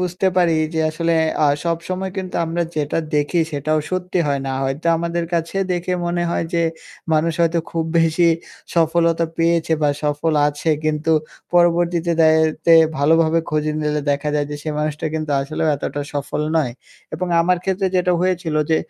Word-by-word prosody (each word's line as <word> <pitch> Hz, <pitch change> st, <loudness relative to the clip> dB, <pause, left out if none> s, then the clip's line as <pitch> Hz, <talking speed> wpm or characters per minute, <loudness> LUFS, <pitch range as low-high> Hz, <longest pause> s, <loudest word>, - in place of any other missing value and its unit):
বুঝতে 180 Hz, +1 st, -1 dB
পারি 175 Hz, -2 st, +4 dB, 0.2 s
যে 160 Hz, -, +1 dB
আসলে 165 Hz, +2 st, -1 dB, 0.3 s
আ -, -, +5 dB, 0.2 s
সবসময় 180 Hz, +3 st, -2 dB
কিন্তু 185 Hz, -1 st, -5 dB
আমরা 165 Hz, +1 st, -1 dB
যেটা 150 Hz, +2 st, -1 dB, 0.2 s
দেখি 150 Hz, +4 st, +1 dB
সেটাও 155 Hz, +2 st, 0 dB
সত্যি 185 Hz, 0 st, -2 dB
হয় 140 Hz, -1 st, 0 dB
না। -, -, -2 dB
হয়তো 135 Hz, +5 st, -3 dB
আমাদের 170 Hz, +1 st, -2 dB
কাছে 165 Hz, +3 st, -2 dB, 0.2 s
দেখে 180 Hz, +1 st, -2 dB
মনে 175 Hz, 0 st, -1 dB
হয় 170 Hz, -, -1 dB
যে, 170 Hz, -, +2 dB, 0.5 s
মানুষ 155 Hz, +2 st, +2 dB
হয়তো 170 Hz, 0 st, +2 dB
খুব 165 Hz, -1 st, -1 dB
বেশি 165 Hz, +1 st, +3 dB, 0.5 s
সফলতা 165 Hz, 0 st, +2 dB
পেয়েছে 165 Hz, 0 st, +2 dB
বা 150 Hz, -, +4 dB, 0.2 s
সফল 150 Hz, +2 st, 0 dB, 0.2 s
আছে 145 Hz, +2 st, -4 dB, 0.2 s
কিন্তু 155 Hz, +1 st, 0 dB, 0.4 s
পরবর্তীতে 175 Hz, 0 st, +3 dB
দায়তে 160 Hz, +1 st, +3 dB, 0.2 s
ভালোভাবে 160 Hz, +3 st, +3 dB
খুঁজে 155 Hz, 0 st, 0 dB
নিলে 150 Hz, 0 st, 0 dB
দেখা 145 Hz, +1 st, -1 dB
যায় 145 Hz, -1 st, 0 dB
যে 145 Hz, -, -4 dB
সে 155 Hz, -, -5 dB
মানুষটা 150 Hz, +1 st, -2 dB
কিন্তু 155 Hz, -1 st, -3 dB
আসলেও 155 Hz, +3 st, -2 dB
এতটা 145 Hz, -, -4 dB
সফল 145 Hz, +1 st, -3 dB, 0.2 s
নয়। 140 Hz, -7 st, +1 dB, 0.4 s
এবং 180 Hz, +3 st, -3 dB
আমার 180 Hz, +2 st, +2 dB
ক্ষেত্রে 190 Hz, 0 st, 0 dB
যেটা 180 Hz, 0 st, +2 dB
হয়েছিল 180 Hz, -3 st, -1 dB, 0.2 s
যে, 160 Hz, -, +4 dB
165 Hz, 165 wpm, -20 LUFS, 155-175 Hz, 0.5 s, আ